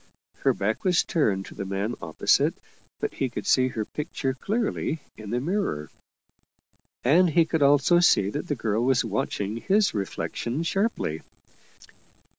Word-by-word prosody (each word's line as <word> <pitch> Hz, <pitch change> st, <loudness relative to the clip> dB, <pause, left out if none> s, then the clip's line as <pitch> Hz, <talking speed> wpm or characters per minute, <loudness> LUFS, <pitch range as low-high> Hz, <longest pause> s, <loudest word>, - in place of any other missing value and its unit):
Her -, -, +2 dB
back 110 Hz, +3 st, -2 dB
was 180 Hz, -2 st, +3 dB
turned 100 Hz, -, 0 dB
to -, -, -11 dB
the -, -, -5 dB
man 100 Hz, +4 st, -2 dB
opposite, 80 Hz, -2 st, +2 dB, 0.4 s
but -, -, -2 dB
he 135 Hz, -, -1 dB
could 120 Hz, -, -6 dB
see 130 Hz, -1 st, +4 dB
her 110 Hz, -4 st, -3 dB
pic 150 Hz, +8 st, -6 dB
ture 135 Hz, -1 st, -1 dB
clearly 210 Hz, -, -2 dB, 0.2 s
in 105 Hz, -1 st, -9 dB
the 120 Hz, +3 st, 0 dB
mirror. 155 Hz, -, -2 dB, 1.1 s
And 170 Hz, +8 st, +5 dB
he 165 Hz, +1 st, +4 dB
could 160 Hz, -1 st, -1 dB
also 145 Hz, +5 st, +5 dB
see 100 Hz, -, +4 dB
that 145 Hz, +7 st, -4 dB
the 145 Hz, -, -1 dB
girl 110 Hz, -1 st, -1 dB
was 130 Hz, -1 st, +2 dB
watching 105 Hz, 0 st, -2 dB
his 195 Hz, -, +2 dB
reflection 115 Hz, -, -3 dB
sharply. 170 Hz, -, -1 dB
130 Hz, 155 wpm, -26 LUFS, 105-170 Hz, 1.1 s, And